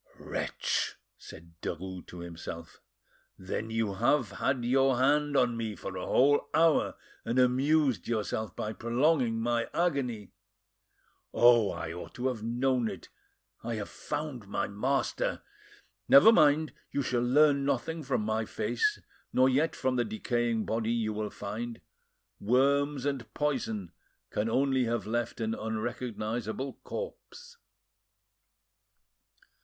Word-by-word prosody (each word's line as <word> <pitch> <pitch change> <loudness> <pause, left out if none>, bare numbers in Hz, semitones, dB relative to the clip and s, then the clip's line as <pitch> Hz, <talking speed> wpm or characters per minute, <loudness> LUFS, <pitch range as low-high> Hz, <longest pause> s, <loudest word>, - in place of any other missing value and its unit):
"Wretch!" - - -2 0.2
said 85 +1 -12
Derues 90 +2 -5
to 90 - -9
himself, 85 -1 -8 0.6
"then 95 +4 -4
you 110 -2 -1
have 125 +6 +2
had 130 -3 -1
your 135 +1 +3
hand 145 +2 +2
on 120 -2 +3
me 110 -2 -3
for 95 - -7
a 90 - -4
whole 145 +3 +3
hour, 165 -1 +3 0.3
and 115 +2 -2
amused 130 - +3
yourself 110 -3 -2
by 110 - -3
prolonging 120 0 +1
my 120 0 0
agony! 130 - -1 1.0
Oh! 120 -3 +5
I 80 - -5
ought 90 - -9
to 130 +1 0
have 120 -4 -4
known 120 +1 0
it; 90 - -9 0.5
I 115 0 -3
have 105 -2 -5
found 145 -7 -5
my 100 - -1
master. 130 +7 -1 0.6
Never 170 +12 +9
mind, 155 -5 +4 0.2
you 140 - -1
shall 125 -1 0
learn 140 +3 +4
nothing 140 +4 -1
from 135 -5 -1
my 110 +1 0
face, 420 - -1 0.3
nor 130 +1 +4
yet 140 +5 +2
from 130 -1 0
the 120 - +3
decaying 115 +1 -1
body 115 0 -1
you 110 -2 0
will 105 0 -3
find; 115 +4 -6 0.6
worms 140 +4 +2
and 130 -6 -3
poison 115 - -2 0.4
can 105 +2 -1
only 130 +1 +2
have 115 -3 -1
left 120 +2 -2
an 110 0 -1
unrecognisable 110 +2 -3
corpse." 485 0 -8
120 Hz, 130 wpm, -30 LUFS, 110-140 Hz, 1.0 s, Never